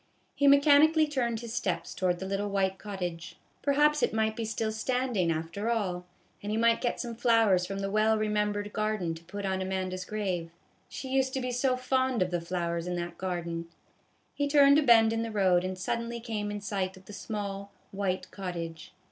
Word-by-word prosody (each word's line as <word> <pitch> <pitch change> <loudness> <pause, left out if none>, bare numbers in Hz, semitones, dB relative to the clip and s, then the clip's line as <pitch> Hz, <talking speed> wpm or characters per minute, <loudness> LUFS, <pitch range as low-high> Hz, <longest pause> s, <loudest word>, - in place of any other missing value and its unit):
He 285 - +2
mechanically 295 +3 +6
turned 240 -6 -1
his 235 -2 -7
steps 250 - -2
towards 180 -2 0
the 190 - -5
little 200 +1 -2
white 190 -1 0
cottage. 180 -5 -5 0.3
Perhaps 295 +2 +3
it - - +1
might 220 0 +1
be 230 - -3
still 220 0 -2
standing, 220 -5 0
after 165 +7 -3
all, 185 -6 -1 0.3
and 205 - -4
he 215 - 0
might 230 0 +3
get 240 - -1
some 240 -2 -4
flowers 225 -6 +3
from 195 - -4
the 195 0 -3
well 215 +1 +3
remembered 210 -1 -1
garden 215 -6 -1
to 165 +1 -11
put 200 +4 -6
on 190 -1 -1
Amanda's 185 -1 -3
grave; 185 -5 -3 0.4
she 265 - -7
used 265 0 +1
to - - 0
be 250 -1 -2
so 255 +1 +1
fond 260 -3 +1
of 180 - -5
the 175 -1 -1
flowers 170 -1 -2
in 180 - -2
that 175 0 -5
garden; 170 -2 -3 0.7
he 285 - -1
turned 285 0 +6
a - - +3
bend 225 -5 +6
in 225 - -1
the 230 - -3
road, 190 -4 +3
and 185 0 -3
suddenly 235 +5 -3
came 220 -3 -3
in 205 0 -4
sight 190 -2 -3
of 190 - -17
the 210 - -11
small, 200 -2 -5 0.2
white 185 -2 -2
cottage. 170 -3 -6
205 Hz, 200 wpm, -29 LUFS, 185-235 Hz, 0.7 s, mechanically